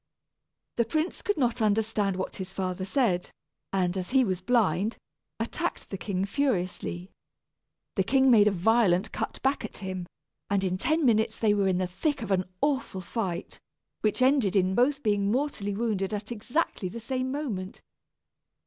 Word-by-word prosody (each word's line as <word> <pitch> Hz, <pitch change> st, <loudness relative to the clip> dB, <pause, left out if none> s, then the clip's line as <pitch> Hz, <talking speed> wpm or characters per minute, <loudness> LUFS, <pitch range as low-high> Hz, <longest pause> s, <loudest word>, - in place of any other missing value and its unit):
The 235 Hz, -, +3 dB
prince 310 Hz, +8 st, -1 dB
could 410 Hz, -, 0 dB
not 240 Hz, -5 st, +1 dB
understand 210 Hz, -2 st, +1 dB
what 185 Hz, -, -4 dB
his 190 Hz, -1 st, -5 dB
father 185 Hz, -1 st, -2 dB
said, 195 Hz, -6 st, +1 dB, 0.4 s
and 185 Hz, -2 st, +1 dB
as 185 Hz, -1 st, -3 dB
he 260 Hz, 0 st, +4 dB
was 185 Hz, -3 st, -1 dB
blind, 210 Hz, -2 st, +2 dB, 0.4 s
attacked -, -, -3 dB
the 195 Hz, -, -3 dB
king 190 Hz, -1 st, -1 dB
furiously. 190 Hz, -6 st, -1 dB, 0.8 s
The -, -, +1 dB
king 265 Hz, -1 st, +4 dB
made 210 Hz, -3 st, +7 dB
a -, -, +4 dB
violent 195 Hz, 0 st, +3 dB
cut -, -, -4 dB
back 270 Hz, +2 st, +1 dB
at -, -, -6 dB
him, 185 Hz, -3 st, -5 dB, 0.4 s
and 200 Hz, -1 st, +1 dB
in 185 Hz, -1 st, -1 dB
ten 315 Hz, +4 st, +2 dB
minutes 220 Hz, -2 st, +3 dB
they 215 Hz, -2 st, +3 dB
were 200 Hz, -2 st, +2 dB
in 185 Hz, -1 st, +2 dB
the 185 Hz, -, +1 dB
thick 265 Hz, -, -2 dB
of 205 Hz, -, -4 dB
an 185 Hz, -1 st, +2 dB, 0.2 s
awful 270 Hz, -9 st, 0 dB
fight, 185 Hz, -1 st, -4 dB, 0.4 s
which 215 Hz, +4 st, +1 dB
ended 255 Hz, -7 st, +3 dB
in 190 Hz, -1 st, +3 dB
both 275 Hz, +6 st, +2 dB
being 205 Hz, -2 st, +2 dB
mortally 230 Hz, -6 st, -1 dB
wounded 210 Hz, -2 st, -1 dB
at 210 Hz, +2 st, -6 dB
exactly 235 Hz, -, -1 dB
the 235 Hz, -, -7 dB
same 255 Hz, +2 st, -2 dB
moment. 220 Hz, -10 st, -4 dB
210 Hz, 165 wpm, -28 LUFS, 190-250 Hz, 0.8 s, made